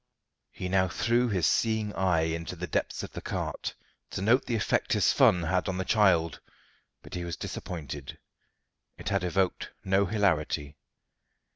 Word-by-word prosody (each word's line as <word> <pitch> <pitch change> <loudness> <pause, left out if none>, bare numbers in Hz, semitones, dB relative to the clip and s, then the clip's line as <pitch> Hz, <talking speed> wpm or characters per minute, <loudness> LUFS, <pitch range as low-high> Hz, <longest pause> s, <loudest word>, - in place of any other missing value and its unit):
He 90 - -5
now 95 0 +3
threw 120 +8 +1
his 95 -5 +1
seeing 110 -2 +1
eye 90 -4 +2
into 80 +2 -2
the 90 +1 -4
depths 80 - -2
of - - -7
the - - -7
cart, - - -4 0.3
to 95 - -4
note 120 +6 +4
the 120 - 0
effect 110 - +1
his - - +3
fun 90 -1 +5
had 90 +3 0
on 95 - -2
the 95 - -2
child, 90 -7 +3 0.6
but - - -12
he 90 - -3
was 85 -2 -4
disappointed. 85 -6 -6 0.8
It - - -4
had - - +1
evoked 90 +1 0 0.2
no 95 +1 +3
hilarity. 80 -8 0
90 Hz, 160 wpm, -29 LUFS, 85-105 Hz, 0.8 s, fun